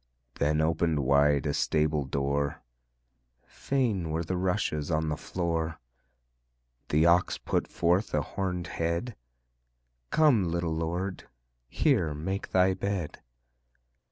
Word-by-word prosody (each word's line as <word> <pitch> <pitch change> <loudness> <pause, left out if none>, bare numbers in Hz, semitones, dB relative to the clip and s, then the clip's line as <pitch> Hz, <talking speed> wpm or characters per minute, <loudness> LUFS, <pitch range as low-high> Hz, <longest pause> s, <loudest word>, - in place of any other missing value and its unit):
Then 75 +2 +2
opened 80 -1 +1
wide 70 +1 +3
a 75 - 0
stable 75 -1 +1
door 70 +1 -1 0.8
Fain 115 -11 -1
were 80 +2 -1
the 90 +3 -3
rushes 90 -5 -1
on 80 -1 0
the 75 - -1
floor; 80 -2 -3 1.1
The 75 +2 +3
Ox 85 +1 +3
put - - -1
forth 90 +5 +1
a - - +2
horned 90 -3 -3 0.2
head: 85 +8 -1 0.9
"Come, 145 -10 +4
little 85 -1 -1
Lord, 85 +4 -3 0.4
here 75 +4 +1
make 95 +6 -4
Thy 95 0 +3
bed." 95 -4 -3
85 Hz, 115 wpm, -28 LUFS, 75-95 Hz, 1.1 s, Come